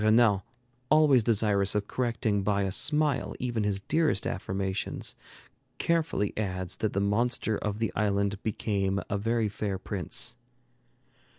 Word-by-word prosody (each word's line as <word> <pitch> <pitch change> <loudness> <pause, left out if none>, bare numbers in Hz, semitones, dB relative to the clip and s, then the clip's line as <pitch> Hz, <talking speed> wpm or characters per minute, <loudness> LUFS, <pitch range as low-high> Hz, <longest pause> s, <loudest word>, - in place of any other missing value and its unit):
Renan, 110 -2 +4 0.5
always 150 -5 +5
desirous 105 -3 +2
of 105 -1 0
correcting 115 -4 0
by 100 0 +1
a 95 - -1
smile 150 +5 +2
even 120 -4 -2
his 100 -1 -1
dearest 155 -3 +1
affirmations, 95 +1 -3 0.6
carefully 165 -11 0
adds 95 -4 -3
that 110 - -1
the 100 - 0
monster 110 +2 +1
of 105 -1 -3
the 110 -4 -1
island 100 -1 0
became 100 -2 -1
a 100 - +1
very 115 +1 +1
fair 100 -1 -3
prince. 95 +3 -2
105 Hz, 130 wpm, -28 LUFS, 100-115 Hz, 0.6 s, always